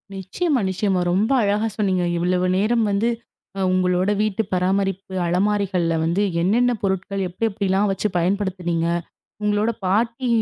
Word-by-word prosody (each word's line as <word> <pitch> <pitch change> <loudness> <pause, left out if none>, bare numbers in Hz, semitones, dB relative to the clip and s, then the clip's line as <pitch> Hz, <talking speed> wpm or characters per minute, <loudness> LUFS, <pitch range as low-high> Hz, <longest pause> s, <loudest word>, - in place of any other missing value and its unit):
நிச்சயமா, 265 - -1
நிச்சயமா. 190 0 0
ரொம்ப 210 +7 +1
அழகா 205 +2 +1
சொன்னீங்க. 190 -4 +1
இவ்வளவு 180 +1 +1
நேரம் 225 +3 +2
வந்து 205 +4 +1 0.5
அ - - 0
உங்களோட 185 +1 +1
வீட்டு 215 0 0
பராமரிப்பு 195 +1 -1
அலமாரிகள்ல 185 -2 +1
வந்து 170 +5 +1 0.2
என்னென்ன 235 +8 +3
பொருட்கள் 195 0 -2
எப்பிடி, 185 +6 -2
எப்பிடிலாம் 200 0 0
வச்சு 195 +2 -1
பயன்படுத்துனீங்க. 180 -2 -1 0.6
உங்களோட 210 +2 +1 0.2
பாட்டி 230 +6 0
195 Hz, 125 wpm, -22 LUFS, 185-210 Hz, 0.6 s, என்னென்ன